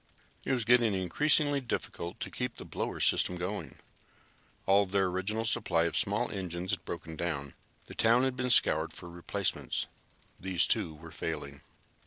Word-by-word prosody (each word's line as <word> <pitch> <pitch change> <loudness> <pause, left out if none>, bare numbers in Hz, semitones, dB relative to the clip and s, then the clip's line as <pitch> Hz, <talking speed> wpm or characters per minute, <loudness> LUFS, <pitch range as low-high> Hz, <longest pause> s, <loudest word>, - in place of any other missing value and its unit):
It - - -2
was 120 -4 0
getting 115 -3 +4
increasingly 145 - +2
difficult 90 -7 -5
to - - -4
keep 125 -1 -4
the - - -8
blower - - -4
system 90 - +4
going. 90 +4 -5 0.9
All 100 +1 +5
of 100 - -3
their 100 0 +2
original 95 +5 -2
supply 105 -7 +1
of 85 - -1
small - - 0
engines 90 -1 -4
had 95 -3 -2
broken 80 -1 -6
down. 70 -5 -3 0.3
The - - -11
town 115 +3 +3
had 130 -1 0
been 125 0 -2
scoured 80 -9 +4
for 90 - -9
replacements. 85 0 -1 0.5
These, 90 -3 +3
too, 80 - +4
were 80 +2 -12
failing. 70 -3 -6
95 Hz, 165 wpm, -30 LUFS, 85-115 Hz, 0.9 s, All